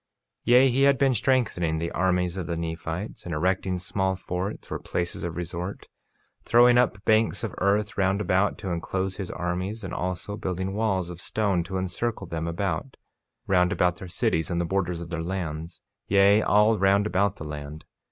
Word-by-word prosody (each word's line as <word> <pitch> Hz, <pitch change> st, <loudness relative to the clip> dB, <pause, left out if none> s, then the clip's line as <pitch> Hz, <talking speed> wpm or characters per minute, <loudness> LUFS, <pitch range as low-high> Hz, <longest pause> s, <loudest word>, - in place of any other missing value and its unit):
48:8 -, -, -59 dB, 0.4 s
Yea, 125 Hz, +3 st, +6 dB
he 130 Hz, +3 st, +1 dB
had 140 Hz, -1 st, +5 dB
been 135 Hz, -1 st, +3 dB
strengthening 105 Hz, -10 st, +1 dB
the 85 Hz, +1 st, -3 dB
armies 90 Hz, -1 st, +1 dB
of 95 Hz, -3 st, -4 dB
the 85 Hz, -1 st, -2 dB
Nephites, 80 Hz, +4 st, -5 dB
and 85 Hz, -3 st, -4 dB
erecting 95 Hz, +2 st, 0 dB
small 95 Hz, +1 st, -1 dB
forts, 95 Hz, +2 st, -5 dB
or -, -, -2 dB
places 85 Hz, 0 st, -3 dB
of 85 Hz, -1 st, -4 dB
resort; 90 Hz, +2 st, -5 dB, 0.6 s
throwing 120 Hz, +1 st, +6 dB
up 110 Hz, -4 st, 0 dB
banks 110 Hz, +1 st, +2 dB
of 110 Hz, -, -3 dB
earth 100 Hz, +2 st, +1 dB
round 95 Hz, +1 st, +2 dB
about 95 Hz, -1 st, +1 dB
to 95 Hz, -4 st, -4 dB
enclose 95 Hz, +2 st, -2 dB
his 95 Hz, -3 st, -4 dB
armies, 90 Hz, +5 st, -3 dB
and 95 Hz, -, -5 dB
also 90 Hz, +3 st, -3 dB
building 95 Hz, -2 st, -3 dB
walls 95 Hz, -5 st, 0 dB
of 90 Hz, 0 st, -9 dB
stone 100 Hz, -5 st, 0 dB
to 95 Hz, +1 st, -4 dB
encircle 95 Hz, +4 st, -2 dB
them 80 Hz, -1 st, -4 dB
about, 100 Hz, +9 st, -3 dB, 0.5 s
round 90 Hz, -2 st, +3 dB
about 90 Hz, 0 st, +1 dB
their 95 Hz, -, -8 dB
cities 80 Hz, -2 st, 0 dB
and 85 Hz, -1 st, -1 dB
the 85 Hz, -, 0 dB
borders 90 Hz, -1 st, -1 dB
of 85 Hz, 0 st, -8 dB
their 85 Hz, -1 st, -2 dB
lands; 85 Hz, -2 st, -4 dB, 0.3 s
yea, 100 Hz, +2 st, +5 dB
all 105 Hz, +1 st, +4 dB
round 100 Hz, +2 st, +4 dB
about 100 Hz, 0 st, +1 dB
the -, -, -8 dB
land. 75 Hz, +1 st, -7 dB
95 Hz, 185 wpm, -26 LUFS, 85-100 Hz, 0.6 s, Yea